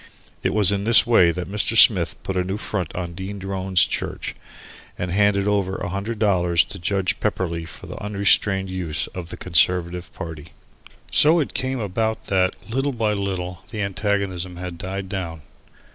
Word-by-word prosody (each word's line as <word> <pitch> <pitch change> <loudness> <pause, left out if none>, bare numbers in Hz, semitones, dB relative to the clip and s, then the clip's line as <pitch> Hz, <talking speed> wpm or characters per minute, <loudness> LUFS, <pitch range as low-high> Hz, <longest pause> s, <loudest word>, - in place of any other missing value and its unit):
It - - 0
was 105 -3 +4
in 100 0 -1
this 115 0 +7
way 115 -8 +5
that 90 0 -3
Mr. 105 +2 0
Smith - - +6
put 95 - -3
the 90 -1 0
new 95 +3 -3
font 95 -6 -3
in 85 -1 -4
Dean 95 +3 -6
Drone's 95 -2 +1
church, - - -3 0.6
and 90 0 -3
handed 100 +1 +2
over 100 -2 +1
a - - -4
hundred 100 +4 -3
dollars 90 -4 +3
to 100 - -9
Judge 95 +2 0
Pepperleigh 85 -5 -2
for - - -11
the - - -8
unrestrained 100 -1 +2
use 90 -5 -2
of 90 -2 -7
the 90 - -6
Conservative 90 0 +1
party. 80 -4 -7 0.6
So 160 +3 +5
it 150 - -2
came 130 0 -2
about 110 +2 -2
that, 95 -1 +2
little 135 +5 -1
by 110 -3 0
little, 95 -2 -3
the 105 -2 -3
antagonism 100 -3 -2
had 90 -1 -7
died 95 +1 -4
down. 85 -5 -5
95 Hz, 175 wpm, -22 LUFS, 90-105 Hz, 0.6 s, this